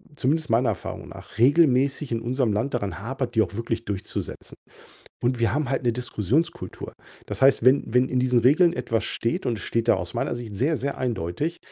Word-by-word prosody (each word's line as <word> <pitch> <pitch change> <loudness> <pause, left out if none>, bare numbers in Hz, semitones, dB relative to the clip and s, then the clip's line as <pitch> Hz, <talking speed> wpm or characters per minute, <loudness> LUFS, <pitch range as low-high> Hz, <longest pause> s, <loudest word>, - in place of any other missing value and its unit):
zumindest 155 +3 0
meiner 115 +2 +3
Erfahrung - - -5
nach, - - -12
regelmäßig 140 0 +3
in 115 - -1
unserem 120 -2 0
Land 115 +7 -1
daran 100 -8 -2
hapert, 125 +2 -4
die 110 - +5
auch 110 - -1
wirklich 115 0 -3
durchzusetzen. 100 +1 -5 0.7
Und 120 0 0
wir 115 - +2
haben 145 -2 -1
halt 135 -1 -1
'ne 120 - +2
Diskussionskultur. 125 - -2 0.3
Das - - -5
heißt, 135 -3 +5
wenn 130 +2 +5
wenn 125 +1 +4
in 130 - +1
diesen 125 -1 +3
Regeln 155 +9 +5
etwas 115 -9 -1
steht 115 - -2
und 115 -3 0
es - - -8
steht 115 0 -1
da - - +6
aus 90 +1 -5
meiner - - -1
Sicht 115 -4 -7
sehr, 145 +9 +1
sehr 140 +3 -3
eindeutig 125 - -2
125 Hz, 200 wpm, -24 LUFS, 115-140 Hz, 0.7 s, da